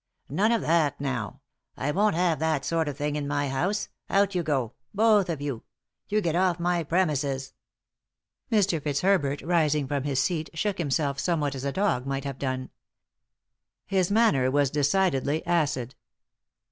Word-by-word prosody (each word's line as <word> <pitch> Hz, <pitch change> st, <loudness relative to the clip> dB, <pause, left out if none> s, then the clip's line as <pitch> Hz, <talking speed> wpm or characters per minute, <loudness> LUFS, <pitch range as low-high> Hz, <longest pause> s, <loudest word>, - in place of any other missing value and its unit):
" -, -, -44 dB
None 220 Hz, +2 st, +4 dB
of 230 Hz, -, +2 dB
that, 160 Hz, -3 st, +1 dB
now; 125 Hz, -8 st, -3 dB, 0.4 s
I 145 Hz, -, -1 dB
won't 205 Hz, +3 st, +2 dB
have 170 Hz, -4 st, +1 dB
that 155 Hz, -3 st, 0 dB
sort 165 Hz, -1 st, 0 dB
of 145 Hz, -, -4 dB
thing 145 Hz, 0 st, -2 dB
in 145 Hz, -1 st, -2 dB
my 145 Hz, -1 st, -1 dB
house 180 Hz, +11 st, -1 dB
— -, -, -60 dB
out 200 Hz, 0 st, +2 dB
you 180 Hz, -, +1 dB
go, 135 Hz, -8 st, -1 dB, 0.2 s
both 210 Hz, -3 st, +4 dB
of 160 Hz, -4 st, -3 dB
you. 140 Hz, -6 st, -3 dB, 0.5 s
You 215 Hz, +1 st, +2 dB
get 170 Hz, -4 st, -1 dB
off 180 Hz, -1 st, +2 dB
my 175 Hz, 0 st, +1 dB
premises." 145 Hz, -5 st, 0 dB, 1.0 s
Mr. 195 Hz, -7 st, +2 dB
Fitzherbert, 145 Hz, -1 st, +1 dB
rising 150 Hz, -4 st, +1 dB
from 140 Hz, 0 st, -1 dB
his 140 Hz, -2 st, 0 dB
seat, 160 Hz, +1 st, -1 dB
shook 200 Hz, +3 st, -1 dB
him 160 Hz, -4 st, -1 dB
self 140 Hz, 0 st, 0 dB
somewhat 150 Hz, -4 st, 0 dB
as 135 Hz, 0 st, -5 dB
a 140 Hz, -, 0 dB
dog 160 Hz, -8 st, 0 dB
might 135 Hz, 0 st, -2 dB
have 140 Hz, -2 st, -5 dB
done. 130 Hz, -1 st, -3 dB, 1.1 s
Hit 190 Hz, -2 st, +1 dB
manner 200 Hz, -, +3 dB
was 140 Hz, 0 st, +2 dB
decidedly 150 Hz, 0 st, +1 dB
acid. 145 Hz, -8 st, 0 dB
150 Hz, 170 wpm, -26 LUFS, 140-180 Hz, 1.1 s, None